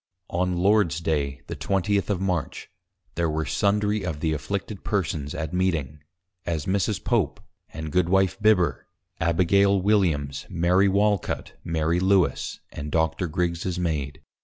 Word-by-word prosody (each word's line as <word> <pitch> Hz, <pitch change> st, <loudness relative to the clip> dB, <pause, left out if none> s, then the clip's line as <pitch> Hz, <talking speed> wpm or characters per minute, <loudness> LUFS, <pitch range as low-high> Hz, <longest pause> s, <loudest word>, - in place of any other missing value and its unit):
On 90 Hz, 0 st, 0 dB
Lords 95 Hz, -3 st, +3 dB
Day, 70 Hz, -4 st, -1 dB
the 85 Hz, -, -6 dB
Twentieth 95 Hz, +7 st, 0 dB
of 100 Hz, -4 st, 0 dB
March, 90 Hz, -5 st, -3 dB, 0.4 s
there 85 Hz, -1 st, 0 dB
were 80 Hz, 0 st, -1 dB
sundry 105 Hz, +1 st, +1 dB
of 80 Hz, -5 st, -3 dB
the 80 Hz, 0 st, 0 dB
afflicted 100 Hz, +6 st, -4 dB
Persons 80 Hz, -8 st, -2 dB
at 80 Hz, +1 st, -4 dB
Meeting, 80 Hz, -6 st, -1 dB, 0.4 s
as 80 Hz, -4 st, -2 dB
Mrs. 95 Hz, -1 st, 0 dB
Pope, -, -, 0 dB, 0.3 s
and 80 Hz, 0 st, -6 dB
Goodwife 90 Hz, +3 st, +2 dB
Bibber, 105 Hz, -5 st, +2 dB, 0.3 s
Abigail 95 Hz, +4 st, +3 dB
Williams, 85 Hz, -9 st, +1 dB
Mary 90 Hz, +2 st, +3 dB
Walcut, 100 Hz, 0 st, 0 dB
Mary 80 Hz, +1 st, 0 dB
Lewes, 95 Hz, -1 st, +1 dB
and 75 Hz, +1 st, -6 dB
Doctor 80 Hz, +2 st, +1 dB
Grigg's 85 Hz, +2 st, -2 dB
Maid. 75 Hz, -6 st, -2 dB
85 Hz, 135 wpm, -25 LUFS, 80-100 Hz, 0.4 s, Lords